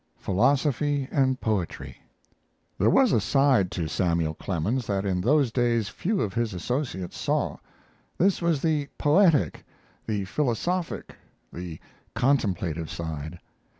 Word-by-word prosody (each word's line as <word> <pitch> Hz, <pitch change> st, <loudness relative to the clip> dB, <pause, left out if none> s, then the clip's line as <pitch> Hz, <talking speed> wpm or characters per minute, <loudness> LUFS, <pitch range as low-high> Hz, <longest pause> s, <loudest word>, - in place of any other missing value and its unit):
PHILOSOPHY 140 Hz, -, +1 dB
AND 130 Hz, -2 st, +2 dB
POETRY 100 Hz, -7 st, -2 dB, 0.8 s
There 105 Hz, -, +4 dB
was 255 Hz, -, +4 dB
a 110 Hz, -, +3 dB
side 130 Hz, -5 st, +3 dB
to 85 Hz, -3 st, -2 dB
Samuel 85 Hz, 0 st, 0 dB
Clemens 100 Hz, +9 st, -2 dB
that 100 Hz, -1 st, -1 dB
in 90 Hz, -2 st, 0 dB
those 135 Hz, +3 st, +3 dB
days 115 Hz, -3 st, +1 dB
few 200 Hz, +2 st, -1 dB
of 95 Hz, -, -2 dB
his 115 Hz, -3 st, -1 dB
associates 105 Hz, -, -3 dB
saw. -, -, 0 dB, 0.6 s
This 190 Hz, +1 st, +2 dB
was 170 Hz, -5 st, +1 dB
the 150 Hz, -3 st, +1 dB
poetic, 150 Hz, -, +3 dB, 0.4 s
the 105 Hz, -3 st, -1 dB
philosophic, 150 Hz, -, -2 dB, 0.4 s
the 85 Hz, -2 st, -6 dB, 0.4 s
contemplative 95 Hz, -, 0 dB
side. 80 Hz, 0 st, -5 dB
115 Hz, 120 wpm, -26 LUFS, 90-145 Hz, 0.8 s, There